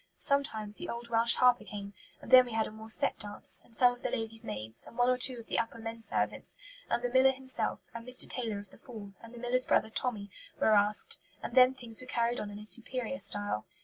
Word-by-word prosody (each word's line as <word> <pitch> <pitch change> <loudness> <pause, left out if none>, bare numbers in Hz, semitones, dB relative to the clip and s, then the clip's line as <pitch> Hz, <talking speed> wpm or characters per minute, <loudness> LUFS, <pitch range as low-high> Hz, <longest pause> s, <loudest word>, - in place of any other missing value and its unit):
Sometimes 220 -7 -2
the - - -7
old 235 0 -6
Welsh 230 0 +7
harper 250 -2 +3
came, 200 -1 -8 0.3
and - - -10
then 255 -1 +8
we 240 - -8
had 220 -1 0
a - - -8
more 220 +1 -12
set 220 - +4
dance, 205 -1 -2
and 230 - -16
some 245 +1 +4
of 245 - -15
the - - -2
ladies' 225 0 -2
maids, 110 - -3
and - - -14
one 245 +1 +3
or 255 - +1
two 255 -1 +6
of 230 - -10
the - - -1
upper 230 0 -3
men 225 0 -7
servants, - - -2 0.3
and 240 - -1
the 245 - -1
miller 260 +2 +5
himself, 260 -4 -4
and 230 +1 -9
Mr. 250 0 -2
Taylor 230 -5 -2
of 200 -1 -11
the - - -18
Fall, 210 -5 -11
and 230 - -13
the 240 - -12
miller's 250 +1 -1
brother 220 - +1
Tommy, 210 -5 -1 0.3
were 220 - +3
asked, 210 - +1 0.2
and - - -6
then 255 +1 +6
things 235 -3 -4
were 255 - -12
carried 240 -1 -1
on 210 - -5
in 205 - -9
a 210 - -10
superior 250 +4 +1
style. 205 - -1
230 Hz, 245 wpm, -30 LUFS, 215-250 Hz, 0.3 s, then